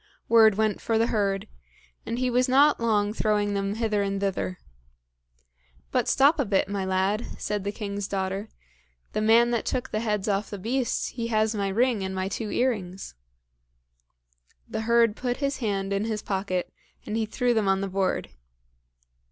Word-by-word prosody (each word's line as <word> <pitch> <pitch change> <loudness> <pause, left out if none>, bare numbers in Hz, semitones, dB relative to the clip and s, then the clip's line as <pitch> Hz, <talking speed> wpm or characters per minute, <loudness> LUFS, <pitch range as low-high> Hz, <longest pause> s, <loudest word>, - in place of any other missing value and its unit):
Word 220 -3 +6
went 215 -1 0
for 225 - 0
the 225 - +3
herd; 200 -4 0 0.6
and 230 - -2
he 255 0 0
was 250 +2 +2
not 285 +3 +5
long 210 -3 +1
throwing 210 -2 +1
them 200 0 -1
hither 220 -2 0
and 200 0 -1
thither. 195 -2 -2 1.3
"But 250 -3 +1
stop 290 +4 +4
a 280 - +2
bit, 195 -2 +1
my 200 -1 -2
lad," 190 +4 0
said 210 -1 -3
the 200 - -2
king's 205 -2 -4
daughter; 195 +2 -3 0.6
"the 215 - 0
man 230 +2 +5
that 235 - 0
took 255 0 -3
the 215 - -1
heads 210 -3 -1
off 205 0 0
the 205 - -5
beast, 240 +6 -1
he 230 -2 -4
has 220 -1 +1
my 200 -2 -1
ring 225 +1 +1
and 190 0 -4
my 190 0 -2
two 215 +1 -4
earrings." 195 -7 -2 1.5
The - - -3
herd 230 -1 +3
put 245 0 -2
his 280 0 -1
hand 200 -4 -2
in 200 +2 0
his 215 -2 -3
pocket, 190 -2 -2 0.3
and 210 - -3
he 225 -1 0
threw 245 +2 +1
them 220 -3 +1
on 195 0 +2
the 195 - -1
board. 190 0 -1
210 Hz, 175 wpm, -26 LUFS, 195-230 Hz, 1.5 s, Word